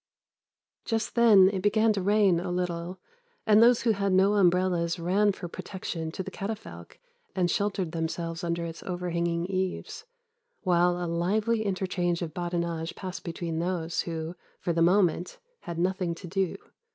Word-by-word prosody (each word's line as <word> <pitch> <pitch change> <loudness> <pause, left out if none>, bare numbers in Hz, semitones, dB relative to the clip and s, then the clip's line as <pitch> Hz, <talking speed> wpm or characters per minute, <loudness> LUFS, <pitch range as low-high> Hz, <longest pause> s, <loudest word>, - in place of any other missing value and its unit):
"Just 225 -1 -2
then 220 -6 +7
it 190 - -2
began 215 +2 +3
to 200 - -2
rain 200 -2 +3
a 180 +1 -4
little, 180 0 -3 0.5
and 215 0 +6
those 235 +1 +5
who 230 - +3
had 200 -2 0
no 190 +2 +4
umbrellas 180 -3 +2
ran 190 +5 +2
for 190 -2 -7
protection 170 -2 -5
to 190 - -4
the - - -7
catafalque 195 - -7 0.4
and 180 -2 +1
sheltered 195 -4 -1
themselves 165 +1 -3
under 170 0 -1
its 165 0 -7
overhanging 170 -1 -2
eaves, 190 - -3 0.6
while 175 -1 +3
a 180 - -3
lively 205 +7 0
interchange 185 -3 -1
of 160 -3 -5
badinage 170 -1 -3
passed 185 -1 -6
between 165 -1 -4
those 170 -1 -1
who, 165 0 -5 0.2
for 170 - -1
the 165 - 0
moment, 180 0 +2 0.2
had 170 -1 -7
nothing 180 -1 0
to 180 - -10
do. 190 0 -1
180 Hz, 155 wpm, -28 LUFS, 170-195 Hz, 0.6 s, then